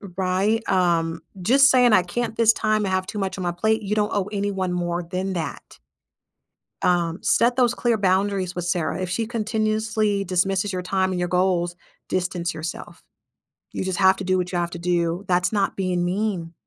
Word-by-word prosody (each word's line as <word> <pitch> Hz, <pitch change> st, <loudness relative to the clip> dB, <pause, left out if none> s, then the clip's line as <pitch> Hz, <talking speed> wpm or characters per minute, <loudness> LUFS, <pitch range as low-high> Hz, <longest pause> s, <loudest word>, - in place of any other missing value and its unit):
Right? 190 Hz, +4 st, +1 dB
Um, 165 Hz, -3 st, +1 dB, 0.2 s
just 265 Hz, +8 st, +5 dB
saying, 250 Hz, -3 st, +5 dB
"I 185 Hz, -4 st, +5 dB
can't 225 Hz, +6 st, -3 dB
this 225 Hz, -1 st, +5 dB
time, 215 Hz, -1 st, 0 dB
I 190 Hz, -, -1 dB
have 185 Hz, 0 st, -1 dB
too 210 Hz, 0 st, -6 dB
much 195 Hz, -1 st, -2 dB
on 185 Hz, -, -4 dB
my 175 Hz, -, 0 dB
plate." 220 Hz, +5 st, 0 dB
You 210 Hz, +1 st, -2 dB
don't 210 Hz, 0 st, 0 dB
owe 200 Hz, 0 st, -1 dB
anyone 200 Hz, -2 st, -2 dB
more 175 Hz, 0 st, -2 dB
than 185 Hz, +3 st, -3 dB
that. 165 Hz, -5 st, -6 dB, 1.1 s
Um, 175 Hz, -1 st, +1 dB
set 240 Hz, +1 st, +3 dB
those 245 Hz, -2 st, +3 dB
clear 235 Hz, -2 st, +1 dB
boundaries 190 Hz, -1 st, 0 dB
with 175 Hz, -1 st, -3 dB
Sarah. 175 Hz, 0 st, -1 dB
If 185 Hz, -, -3 dB
she 225 Hz, +5 st, -1 dB
continuously 215 Hz, -2 st, -1 dB
dismisses 190 Hz, +2 st, 0 dB
your 180 Hz, -1 st, -3 dB
time 190 Hz, 0 st, 0 dB
and 180 Hz, -, -2 dB
your 175 Hz, -, 0 dB
goals, 180 Hz, -1 st, +1 dB, 0.3 s
distance 180 Hz, -2 st, -2 dB
yourself. 160 Hz, +2 st, -7 dB, 0.7 s
You -, -, -3 dB
just 190 Hz, 0 st, -2 dB
have 190 Hz, 0 st, +5 dB
to 190 Hz, -, -6 dB
do 185 Hz, 0 st, +1 dB
what 180 Hz, 0 st, -2 dB
you 175 Hz, -, 0 dB
have 175 Hz, 0 st, -1 dB
to 175 Hz, -, -6 dB
do. 175 Hz, +1 st, -1 dB
That's 180 Hz, +2 st, +1 dB
not 200 Hz, -2 st, 0 dB
being 180 Hz, -2 st, 0 dB
mean. 185 Hz, -3 st, -2 dB
190 Hz, 195 wpm, -23 LUFS, 175-210 Hz, 1.1 s, just